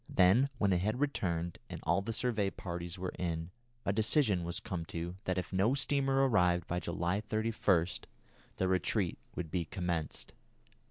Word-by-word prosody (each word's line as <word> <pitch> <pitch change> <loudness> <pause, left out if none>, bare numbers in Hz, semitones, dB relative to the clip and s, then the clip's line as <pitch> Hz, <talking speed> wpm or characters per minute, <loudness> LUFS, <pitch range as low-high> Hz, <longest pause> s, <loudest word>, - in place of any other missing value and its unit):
Then 105 +10 +5
when 100 -4 +3
it 90 - +2
had 110 +6 0
returned 85 - -1
and - - -6
all 85 +4 +2
the 110 +4 -3
survey 110 -4 +1
parties 85 -1 -5
were 90 0 -3
in, 85 -1 -2 0.3
a 100 - +2
decision 110 - +2
was 85 0 -3
come 90 -6 -4
to 85 +2 -4
that 95 0 0
if 90 0 -3
no 100 +8 +3
steamer 135 -1 +2
arrived 90 -7 +3
by 90 - -1
July 85 +3 -1
31 110 -5 +2 0.7
the 95 - +1
retreat 95 +1 +1 0.2
would 80 -4 -4
be 90 -3 0
commenced. 85 -3 -3
95 Hz, 165 wpm, -33 LUFS, 85-110 Hz, 0.7 s, Then